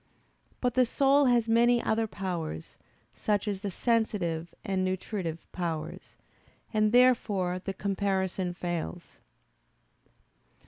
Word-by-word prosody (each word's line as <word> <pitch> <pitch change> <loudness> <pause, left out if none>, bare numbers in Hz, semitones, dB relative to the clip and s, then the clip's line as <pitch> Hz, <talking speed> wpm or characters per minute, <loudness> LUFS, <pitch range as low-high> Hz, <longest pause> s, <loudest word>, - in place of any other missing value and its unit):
But 250 -2 +1
the 255 -1 +4
soul 280 +3 +4
has 240 -3 +3
many 235 +1 +4
other 225 -1 0
powers, 175 - -5 0.4
such 210 0 -1
as 200 -2 -2
the 205 - -2
sensitive 185 -7 0
and 190 -1 0
nutritive 185 -3 -3
powers, 165 -4 -5 0.6
and 215 -1 +3
therefore 210 -7 +3
the 195 - -3
comparison 190 -2 -1
fails. 175 0 -5
195 Hz, 105 wpm, -29 LUFS, 180-230 Hz, 0.6 s, the